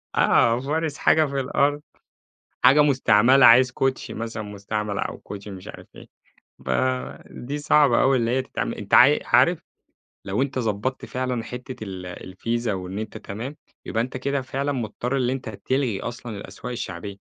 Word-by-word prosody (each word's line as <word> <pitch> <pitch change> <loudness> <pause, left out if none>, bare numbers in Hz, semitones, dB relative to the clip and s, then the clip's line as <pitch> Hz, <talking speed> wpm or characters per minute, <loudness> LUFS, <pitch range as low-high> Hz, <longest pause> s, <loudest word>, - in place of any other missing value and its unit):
آه. 115 +1 +4
فارش 155 +2 -2
حاجة 155 0 +4
في 140 -1 -3
الأرض؛ 145 +3 +1 0.9
حاجة 135 +4 +7
مستعملة، 130 -2 +5
عايِز 125 +2 +7
كوتشي 135 +1 -2
مثلًا 115 -1 -5
مستعمَل 105 0 -4
أو - - -4
كوتشي 100 0 -9
مش 95 -2 -9
عارِف - - -11
إيه، - - -12 0.6
فدي 130 +1 -3
صعبة 145 -4 +4
أوي 135 -1 +4
إن 115 - 0
هي 125 +3 +1
تتعمَل. 130 - -4
أنتَ - - -9
عا - - +7
عارِف - - +3 0.7
لو 100 +5 -1
أنتَ 135 -1 -1
ضبَطت 115 +3 -2
فعلًا 125 -2 -3
حتّة 125 +2 -7
ال 90 -3 -7 0.2
الVISA 115 +3 -2
وإن 95 -1 -3
أنتَ 110 0 -6
تمام، 120 +9 -7 0.3
يبقى 115 - -1
أنتَ 130 +1 -5
كده 140 +1 -1
فعلًا 135 +2 -3
مضطَر 125 +1 -3
إن 125 -1 +1
أنتَ 130 -3 -4
تلغِي 120 0 -2
أصلًا 120 -3 -6
الأسواق 125 +4 -8
الشعبية، 100 -3 -6
125 Hz, 160 wpm, -23 LUFS, 105-135 Hz, 0.9 s, حاجة